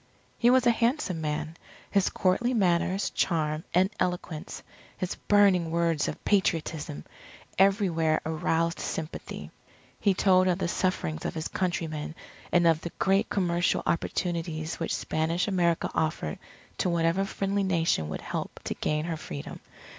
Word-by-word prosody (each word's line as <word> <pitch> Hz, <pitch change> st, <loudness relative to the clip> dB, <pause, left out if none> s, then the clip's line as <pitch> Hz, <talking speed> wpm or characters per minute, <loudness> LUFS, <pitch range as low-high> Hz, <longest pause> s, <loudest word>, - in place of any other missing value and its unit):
He 240 Hz, -, +3 dB
was 255 Hz, 0 st, +5 dB
a 240 Hz, -, +6 dB
handsome 230 Hz, -, 0 dB
man. 155 Hz, +1 st, -3 dB, 0.4 s
His 200 Hz, -2 st, +3 dB
courtly 240 Hz, +7 st, +1 dB
manners, 185 Hz, -1 st, +1 dB
charm, 155 Hz, -2 st, 0 dB
and 185 Hz, +3 st, +3 dB
eloquence, 180 Hz, -3 st, -3 dB, 0.3 s
his 185 Hz, -, -2 dB
burning 195 Hz, -5 st, +3 dB
words 165 Hz, -2 st, +1 dB
of -, -, -6 dB
Patriotism, 160 Hz, -, 0 dB, 0.5 s
everywhere 180 Hz, -5 st, +3 dB
aroused 165 Hz, +1 st, 0 dB
sympathy. 160 Hz, 0 st, -5 dB, 0.5 s
He 200 Hz, -3 st, +2 dB
told 185 Hz, -1 st, +4 dB
of 180 Hz, -2 st, +2 dB
the 190 Hz, -, -1 dB
sufferings 170 Hz, -, -1 dB
of -, -, -3 dB
his 160 Hz, 0 st, -2 dB
countrymen, 160 Hz, -4 st, -2 dB, 0.4 s
and 175 Hz, -1 st, +4 dB
of 165 Hz, -1 st, +4 dB
the 170 Hz, -, -4 dB
great 195 Hz, +3 st, +2 dB
commercial 175 Hz, -3 st, +1 dB
opportunities 165 Hz, -2 st, -2 dB
which 165 Hz, -, -1 dB
Spanish 165 Hz, +4 st, -1 dB
America 175 Hz, -4 st, +1 dB
offered 155 Hz, -, -1 dB, 0.4 s
to 185 Hz, -, +1 dB
whatever 170 Hz, +2 st, +2 dB
friendly 195 Hz, 0 st, -1 dB
Nation 165 Hz, -, +1 dB
would 75 Hz, -, -4 dB
help -, -, -5 dB
to -, -, -2 dB
gain 150 Hz, +1 st, -1 dB
her 165 Hz, -2 st, -3 dB
Freedom. 75 Hz, -, -7 dB
170 Hz, 140 wpm, -28 LUFS, 160-190 Hz, 0.5 s, a